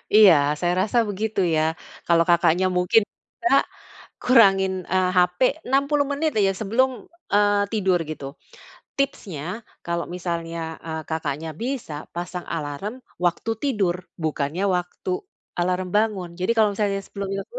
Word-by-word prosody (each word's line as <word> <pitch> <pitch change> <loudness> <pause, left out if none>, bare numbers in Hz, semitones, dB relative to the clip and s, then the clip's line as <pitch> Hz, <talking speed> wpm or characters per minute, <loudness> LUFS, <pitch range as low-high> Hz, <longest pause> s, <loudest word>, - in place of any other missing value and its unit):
Iya, 210 -4 +9 0.3
saya 175 0 +1
rasa 220 +4 -1
begitu 210 +1 -2 0.2
ya. 155 - +3 0.5
Kalau 170 -1 +5
Kakaknya, 170 +1 +4
mungkin 180 +5 +4
bisa, 355 -4 -3 0.7
kurangin, 195 -6 +5 0.2
eee, 185 -1 +3
HP 180 0 +3 0.3
60 280 +2 +2
menit 305 +2 0
aja 195 -1 +3
sebelum, 230 +6 +2 0.5
eee, 205 0 +4
tidur, 190 -4 +2
gitu. 140 -3 -6 0.7
Tipsnya, 200 - -2 0.4
kalau 170 0 -1
misalnya, 170 -2 -3 0.3
eee, 160 0 -4
Kakaknya 160 0 -3
bisa, 250 - -3 0.2
pasang 175 +1 -5
alarm 165 - -5 0.2
waktu 175 +6 0
tidur, 205 -11 +1 0.2
bukannya 155 +3 -1
waktu 180 - -5 0.5
alarm 180 +1 0
bangun. 210 -5 0
Jadi 185 +5 +2
kalau 215 -2 +4
misalnya 200 -2 0
sebelumnya 195 0 -4
itu 485 - -8
190 Hz, 130 wpm, -23 LUFS, 170-220 Hz, 0.7 s, Iya